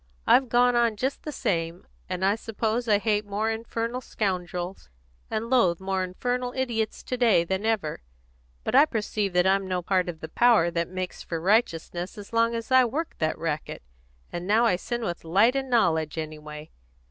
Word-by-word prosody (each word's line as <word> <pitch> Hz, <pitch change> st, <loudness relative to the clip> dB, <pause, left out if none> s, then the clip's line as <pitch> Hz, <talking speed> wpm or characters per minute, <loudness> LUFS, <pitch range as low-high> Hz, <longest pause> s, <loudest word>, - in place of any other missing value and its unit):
I've 260 Hz, -2 st, +5 dB
gone 245 Hz, +1 st, +4 dB
on 235 Hz, -2 st, +3 dB
just 265 Hz, +6 st, -2 dB
the 305 Hz, -, -5 dB
same, 170 Hz, -, -2 dB, 0.2 s
and 185 Hz, 0 st, -1 dB
I 195 Hz, -, +4 dB
suppose 225 Hz, +2 st, -2 dB
I 210 Hz, -2 st, +5 dB
hate 210 Hz, 0 st, 0 dB
more 210 Hz, +2 st, -1 dB
infernal 230 Hz, +2 st, -3 dB
scoundrels 180 Hz, -, -3 dB, 0.4 s
and 220 Hz, +1 st, -2 dB
loathe 230 Hz, -9 st, +3 dB
more 190 Hz, 0 st, -1 dB
infernal 245 Hz, +7 st, -2 dB
idiots 230 Hz, -4 st, -2 dB
to 250 Hz, -, -3 dB
day 230 Hz, -8 st, +4 dB
than 190 Hz, +5 st, -2 dB
ever; 200 Hz, -9 st, -1 dB, 0.6 s
but -, -, -3 dB
I 280 Hz, +4 st, +7 dB
perceive 210 Hz, -6 st, -2 dB
that 180 Hz, 0 st, +3 dB
I'm 195 Hz, 0 st, +2 dB
no 180 Hz, -1 st, -2 dB
part 185 Hz, 0 st, +1 dB
of 165 Hz, -2 st, -6 dB
the 160 Hz, -, -7 dB
power 225 Hz, -5 st, +4 dB
that 170 Hz, 0 st, -1 dB
makes 185 Hz, 0 st, -5 dB
for 165 Hz, -, -4 dB
righteousness 180 Hz, -2 st, 0 dB
as 205 Hz, +2 st, -10 dB
long 230 Hz, 0 st, +2 dB
as 230 Hz, +2 st, -5 dB
I 260 Hz, 0 st, +7 dB
work 295 Hz, +7 st, -2 dB
that 155 Hz, -1 st, 0 dB
racket; 155 Hz, -, -4 dB, 0.5 s
and 175 Hz, +1 st, -5 dB
now 220 Hz, +3 st, +4 dB
I 225 Hz, -, +3 dB
sin 240 Hz, +6 st, -4 dB
with 175 Hz, -5 st, -4 dB
light 200 Hz, +10 st, +3 dB
and 270 Hz, -1 st, -2 dB
knowledge, 165 Hz, -, +2 dB
anyway. 150 Hz, -1 st, -7 dB
205 Hz, 185 wpm, -26 LUFS, 175-235 Hz, 0.6 s, I